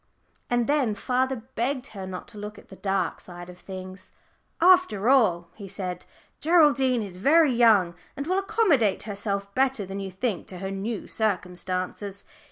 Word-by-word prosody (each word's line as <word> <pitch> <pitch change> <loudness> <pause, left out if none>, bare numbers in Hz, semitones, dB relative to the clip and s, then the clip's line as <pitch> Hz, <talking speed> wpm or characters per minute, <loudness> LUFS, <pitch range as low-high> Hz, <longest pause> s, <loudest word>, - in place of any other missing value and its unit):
And 240 -1 +2
then 275 -7 +1
father 255 +3 -1
begged 260 +3 -1
her 190 -2 -6
not 185 -1 -7
to 215 -3 -11
look 210 0 -7
at - - -16
the 190 - -11
dark 195 -3 -1
side 175 0 -9
of 180 - -16
things. 185 0 -9 0.5
"After 350 - +4
all," 180 -11 +3
he 200 -3 -9
said, 180 -2 -5 0.3
"Geraldine 280 -7 +4
is 185 -3 -7
very 295 - +4
young, 215 -7 +5 0.2
and 280 - -3
will 370 +4 +1
accommodate 390 - +2
herself 200 -1 -3
better 260 -4 +1
than 195 +1 -6
you 195 -1 -4
think 190 0 -3
to 185 - -7
her 195 +1 -4
new 200 +3 -4
circumstances. 185 -1 -2
210 Hz, 165 wpm, -26 LUFS, 190-260 Hz, 0.5 s, young